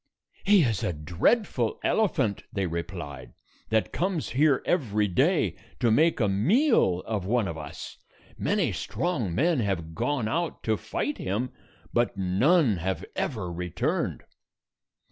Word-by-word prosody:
"He 200 Hz, -3 st, +5 dB
is 115 Hz, -6 st, 0 dB
a 90 Hz, -, 0 dB
dreadful 105 Hz, -, 0 dB
elephant," 140 Hz, -, +1 dB
they 100 Hz, -2 st, -1 dB
replied, 85 Hz, -6 st, -6 dB, 0.4 s
"that 110 Hz, -4 st, +1 dB
comes 180 Hz, -3 st, -1 dB
here 140 Hz, 0 st, +3 dB
every 105 Hz, -, +1 dB
day 120 Hz, -, +2 dB, 0.2 s
to 120 Hz, -3 st, +3 dB
make 160 Hz, +8 st, +3 dB
a 110 Hz, -, +3 dB
meal 110 Hz, -, +3 dB
of 105 Hz, -4 st, -3 dB
one 115 Hz, -1 st, +1 dB
of 85 Hz, -, -4 dB
us. 75 Hz, -2 st, -8 dB, 0.4 s
Many -, -, 0 dB
strong 130 Hz, -, -2 dB
men 160 Hz, +2 st, +2 dB
have 90 Hz, -7 st, -2 dB
gone 130 Hz, -, -1 dB
out 165 Hz, +7 st, -2 dB
to 110 Hz, -, +1 dB
fight 135 Hz, +7 st, -3 dB
him, 110 Hz, +7 st, -2 dB, 0.4 s
but 120 Hz, -4 st, +1 dB
none 110 Hz, -, +3 dB
have 95 Hz, +3 st, -3 dB
ever 100 Hz, -9 st, -2 dB
returned." 90 Hz, -1 st, -2 dB
110 Hz, 135 wpm, -27 LUFS, 90-150 Hz, 0.4 s, He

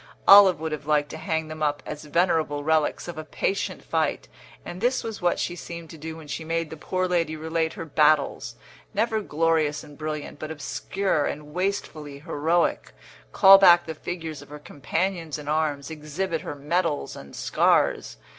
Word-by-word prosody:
Olive 195 Hz, -5 st, +9 dB
would 160 Hz, 0 st, -4 dB
have 150 Hz, -1 st, -5 dB
liked 150 Hz, -1 st, +1 dB
to -, -, -7 dB
hang 160 Hz, 0 st, -2 dB
them 155 Hz, 0 st, -8 dB
up 145 Hz, -1 st, 0 dB
as 150 Hz, 0 st, -7 dB
venerable 155 Hz, -2 st, +1 dB
relics 155 Hz, +1 st, +1 dB
of 170 Hz, -2 st, -6 dB
a -, -, -5 dB
patient 195 Hz, +5 st, -3 dB
fight, -, -, -1 dB, 0.4 s
and 180 Hz, +2 st, -7 dB
this 245 Hz, +2 st, +1 dB
was 225 Hz, -3 st, -6 dB
what 175 Hz, 0 st, +1 dB
she 175 Hz, -, -2 dB
seemed 165 Hz, +2 st, -8 dB
to 160 Hz, -, -10 dB
do 160 Hz, +1 st, -7 dB
when 160 Hz, -2 st, -12 dB
she 160 Hz, -, -5 dB
made 165 Hz, 0 st, -2 dB
the -, -, -6 dB
poor 185 Hz, +4 st, -2 dB
lady 165 Hz, -3 st, 0 dB
relate 160 Hz, +1 st, -2 dB
her 165 Hz, -, -7 dB
battles 150 Hz, -1 st, +2 dB, 0.4 s
never 220 Hz, -1 st, +1 dB
glorious 155 Hz, -3 st, 0 dB
and 145 Hz, 0 st, -14 dB
brilliant, 155 Hz, -2 st, -5 dB
but 155 Hz, -, -6 dB
obscure 160 Hz, +3 st, -2 dB
and 150 Hz, 0 st, -6 dB
wastefully 160 Hz, -6 st, -3 dB
heroic 165 Hz, +2 st, 0 dB, 0.4 s
call 195 Hz, -1 st, +8 dB
back 175 Hz, -3 st, +7 dB
the 160 Hz, -, -5 dB
figures 160 Hz, -2 st, -6 dB
of 145 Hz, -, -15 dB
her 150 Hz, -, -8 dB
companions 160 Hz, +3 st, -3 dB
in 150 Hz, -1 st, -10 dB
arms, 150 Hz, -2 st, -1 dB
exhibit 160 Hz, +2 st, -3 dB
her 145 Hz, -, -6 dB
medals 150 Hz, +1 st, -1 dB
and 70 Hz, -, -11 dB
scars. -, -, +1 dB
160 Hz, 180 wpm, -25 LUFS, 150-175 Hz, 0.4 s, Olive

